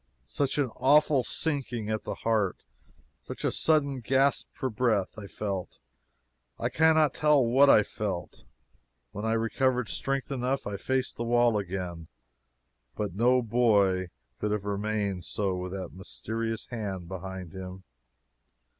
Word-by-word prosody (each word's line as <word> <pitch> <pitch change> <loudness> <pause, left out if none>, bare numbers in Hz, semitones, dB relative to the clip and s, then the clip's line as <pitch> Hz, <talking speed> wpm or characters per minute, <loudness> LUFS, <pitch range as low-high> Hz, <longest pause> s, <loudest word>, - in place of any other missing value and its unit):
Such 135 - -1
an 135 -5 +1
awful 145 0 +4
sinking 125 -8 -2
at 110 - -2
the - - -3
heart 110 -5 0 0.6
such - - -8
a - - +2
sudden 140 -4 +2
gasp 135 +3 +2
for 130 - -3
breath! 110 -4 +1
I 105 -2 -8
felt 100 -3 -4 0.8
I 120 - -1
cannot 155 +1 +4
tell 150 -4 +4
what 135 +4 +5
I 105 - +7
felt. 100 -5 -5 0.7
When 105 +2 -5
I 110 - +1
recovered 125 +1 +1
strength 135 0 -2
enough, 130 +1 -1
I 100 - -3
faced 130 +5 -1
the 120 - -2
wall 120 -1 +3
again. 90 -4 -4 0.9
But 105 -4 -3
no 125 +5 +3
boy 100 -6 +3 0.3
could 105 - -1
have 105 -1 -2
remained 100 -2 -2
so 100 +2 -1
with 90 0 -4
that 95 -2 -6
mysterious 110 +4 -4
hand 100 -7 -4
behind 95 -2 -7
him. 95 0 -8
110 Hz, 140 wpm, -28 LUFS, 95-130 Hz, 0.9 s, I